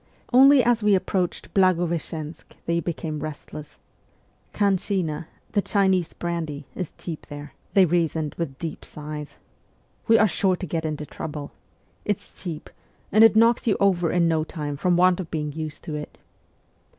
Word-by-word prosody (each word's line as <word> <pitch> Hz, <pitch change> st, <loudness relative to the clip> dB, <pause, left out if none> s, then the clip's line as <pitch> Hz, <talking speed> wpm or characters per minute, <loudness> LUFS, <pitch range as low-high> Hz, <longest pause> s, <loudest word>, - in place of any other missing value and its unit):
Only 270 Hz, +1 st, +8 dB
as 235 Hz, 0 st, +3 dB
we 210 Hz, -1 st, +4 dB
approached 185 Hz, -1 st, -2 dB
Blagoveschensk 170 Hz, -4 st, 0 dB
they 170 Hz, 0 st, +1 dB
became 160 Hz, -2 st, -4 dB
restless. 150 Hz, 0 st, -8 dB, 0.4 s
' -, -, -39 dB
Khanshina 185 Hz, -5 st, 0 dB
' -, -, -35 dB
(the 205 Hz, -, +2 dB
Chinese 190 Hz, -5 st, +1 dB
brandy) 160 Hz, -4 st, -4 dB
is 180 Hz, -4 st, -4 dB
cheap 165 Hz, -3 st, -7 dB
there,' 145 Hz, 0 st, -9 dB, 0.2 s
they 195 Hz, -2 st, +7 dB
reasoned 160 Hz, -3 st, 0 dB
with 145 Hz, -6 st, -4 dB
deep 165 Hz, 0 st, -6 dB
sighs. 150 Hz, 0 st, -7 dB, 0.3 s
' -, -, -38 dB
We 225 Hz, -1 st, +6 dB
are 220 Hz, -, +5 dB
sure 190 Hz, -1 st, +1 dB
to 185 Hz, -, -5 dB
get 160 Hz, -1 st, -2 dB
into 150 Hz, -1 st, -3 dB
trouble! 150 Hz, 0 st, -6 dB, 0.5 s
It's 205 Hz, -2 st, -4 dB
cheap, 170 Hz, -5 st, -6 dB, 0.4 s
and 215 Hz, +2 st, +6 dB
it 225 Hz, -1 st, +7 dB
knocks 230 Hz, +2 st, +4 dB
you 210 Hz, -, +3 dB
over 175 Hz, -4 st, +3 dB
in 175 Hz, -1 st, +3 dB
no 160 Hz, -1 st, +2 dB
time 150 Hz, -2 st, -5 dB
from 175 Hz, +4 st, +2 dB
want 180 Hz, 0 st, +4 dB
of 175 Hz, -3 st, -5 dB
being 150 Hz, -2 st, -2 dB
used 155 Hz, 0 st, -6 dB
to 155 Hz, -, -6 dB
it 150 Hz, 0 st, -6 dB
170 Hz, 165 wpm, -24 LUFS, 155-190 Hz, 0.5 s, Only